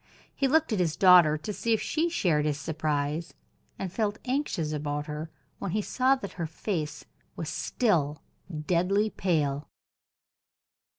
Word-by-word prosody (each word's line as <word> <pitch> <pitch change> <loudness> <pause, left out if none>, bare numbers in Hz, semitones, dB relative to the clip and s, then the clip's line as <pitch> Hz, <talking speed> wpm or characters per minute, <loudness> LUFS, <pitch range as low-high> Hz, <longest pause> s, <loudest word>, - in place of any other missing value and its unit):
He 275 - +2
looked 305 -2 +3
at 205 - 0
his 165 -3 +1
daughter 180 -5 +7
to 210 +7 -5
see 230 +3 0
if - - -2
she 325 +3 0
shared 170 - +1
his 150 -1 -1
surprise, 155 +1 -2 0.4
and 190 -2 -4
felt 210 0 0
anxious 250 - -1
about 145 0 -2
her 150 +1 -5 0.3
when 180 - -3
he 210 - 0
saw 260 +5 +3
that 200 -7 -7
her 165 - -1
face 160 -1 -4 0.3
was - - -4
still 155 - 0 0.4
deadly 195 +5 +2
pale. 150 -6 0
175 Hz, 145 wpm, -28 LUFS, 150-215 Hz, 0.4 s, daughter